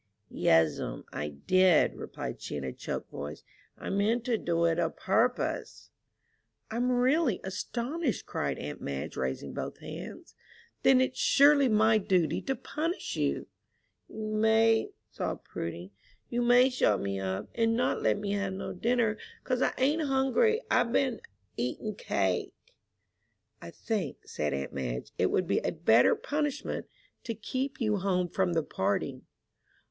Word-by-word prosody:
"Yes'm, 80 -7 +2
I 75 +1 -3
did," 180 - +3
replied - - -6
she, - - -5
in 70 - -4
a 65 - -4
choked - - -5
voice, 75 +1 -7 0.3
"I - - -5
meant 220 +4 +1
to 245 - +2
do 170 -5 0
it 165 0 +2
a 165 -2 +2
purpose." 225 +9 -1 0.8
"I'm 245 +3 0
really 250 - +2
astonished," 240 - -3
cried - - -2
aunt 75 - -6
Madge, 70 -1 -4
raising 65 +1 -3
both - - -5
hands. - - -9 0.5
"Then 260 -1 +5
it's 260 0 -1
surely 280 -1 +5
my 220 0 +4
duty 185 -5 +1
to 270 - -2
punish 325 +8 -3
you." - - -1 0.6
"You - - -13 0.2
may," 220 +1 +3 0.2
sobbed - - -4
Prudy. 85 +3 -6 0.4
"You 240 0 0
may 245 +2 +5
shut 105 - +2
me 100 -1 -2
up, 95 0 -3
and 225 -1 +2
not 250 - +1
let - - +2
me 205 -1 -3
have 200 -1 -1
no 190 - -5
dinner, 225 +1 +1 0.2
'cause 255 -1 -1
I - - +3
ain't 290 +5 +2
hungry. 295 - +2
I've 245 -2 +3
been 250 -2 +1 0.4
eatin' 125 - -2
cake!" 200 - -1 1.1
"I - - -8
think," 200 - -3
said 75 - -2
aunt 70 -1 -3
Madge, 60 -2 -4
"it - - +4
would - - +1
be - - +1
a - - -1
better 115 +2 +4
punishment 295 -1 -2 0.4
to 230 - -3
keep 260 +5 -3
you 215 -4 +1
home 180 -2 0
from 185 -1 0
the 165 -1 +1
party." 100 -6 -1
215 Hz, 150 wpm, -29 LUFS, 150-250 Hz, 1.1 s, Then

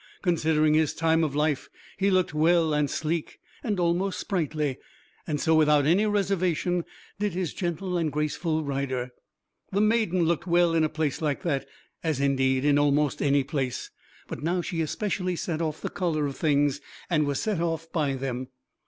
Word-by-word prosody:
Considering 155 -4 +2
his 155 0 +2
time 165 0 +2
of 145 -3 -1
life, 150 -1 0 0.3
he 195 +1 +1
looked 185 -4 +2
well 160 +1 +3
and 150 -1 +1
sleek, 160 +3 -2 0.3
and 205 -5 -1
almost 175 +3 0
sprightly; 155 -7 -1 0.5
and 150 -3 -1
so, 160 - +2
without 150 -2 +4
any 185 +8 +3
reservation, 185 -4 0 0.4
did 205 -3 0
his 180 -2 -2
gentle 175 0 -2
and 160 -2 0
graceful 155 +2 -1
rider. 135 -3 -2 0.6
The 195 - +1
maiden 215 -5 +2
looked 170 +2 0
well 175 -1 +3
in 165 -1 +3
a 155 - +2
place 155 -2 -2
like 150 +2 -1
that, 140 -6 -1 0.4
as 160 -5 0
indeed 135 -1 +2
in 145 -1 +4
almost 145 -1 +2
any 140 -1 +3
place; 135 -3 -3 0.4
but - - -6
now 175 +4 0
she 165 -2 -2
especially 185 +2 -1
set 165 -1 -3
off 155 -2 -2
the - - -2
color 160 -5 0
of 140 -1 -3
things, 145 -2 +1 0.3
and 155 -4 +1
was 140 -1 -1
set 205 -6 -1
off 165 -1 -2
by 145 -5 0
them. 130 -1 -4
160 Hz, 175 wpm, -26 LUFS, 145-175 Hz, 0.6 s, without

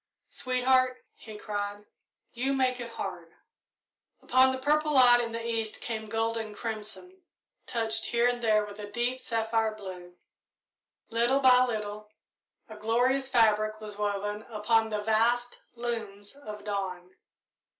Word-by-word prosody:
"Sweetheart," 255 0 +1
he 215 -2 -11
cried, 205 -1 -4 0.5
"you 260 +3 0
make 255 -2 +1
it 240 -1 -5
hard!" - - -6 0.9
Upon 260 +1 +5
the 260 - -2
purple 300 +3 +1
light 245 -3 +7
in 230 -1 -3
the 230 0 -5
east 225 -2 -2
came 220 -2 -4
gold 225 +1 -1
and 215 -2 -5
crimson, 225 - -7 0.5
touched 225 -2 0
here 235 0 +2
and 245 0 -1
there 215 -2 +3
with 205 0 -9
deep 245 +2 -1
sapphire 225 -1 0
blue. 180 -4 -9 1.0
Little 240 +4 +2
by 255 -2 +6
little 210 -2 -4 0.6
a 220 -2 -10
glorious 250 +5 +1
fabric 215 -3 +3
was 210 -1 -7
woven 205 0 -2
upon 225 +1 +2
the 210 -1 -2
vast 235 +3 +1
looms 220 -3 -5
of 210 -7 -9
dawn. 185 -3 -4
225 Hz, 135 wpm, -29 LUFS, 210-245 Hz, 1.0 s, light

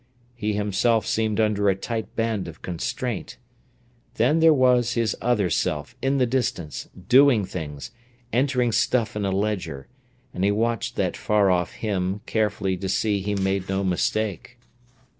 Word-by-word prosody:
He 110 -3 -2
himself 105 +2 +1
seemed 110 -1 0
under 105 -2 +2
a 95 - +2
tight 110 +3 -5
band 115 -4 -1
of 80 -1 -11
constraint. 100 +6 -4 0.8
Then 130 +8 +3
there 165 0 +6
was 125 -4 +3
his 115 -3 0
other 105 -8 +1
self, 75 +8 -1
in 135 +1 +1
the 130 - +3
distance, 115 - -2 0.2
doing 130 -5 +5
things, 75 -6 -6 0.4
entering 125 -1 +2
stuff 115 -1 +1
in 105 -1 -1
a 95 - 0
ledger, 95 -8 -2 0.5
and 90 - -3
he 100 - +4
watched 115 +2 -1
that - - -1
far 105 -3 +2
off 90 -1 0
him 100 -2 -2
carefully 105 -3 0
to 95 +1 -4
see 105 +1 +1
he 105 +2 -2
made 95 -1 -1
no 95 0 0
mistake. 105 +4 -1
105 Hz, 155 wpm, -24 LUFS, 95-120 Hz, 0.8 s, there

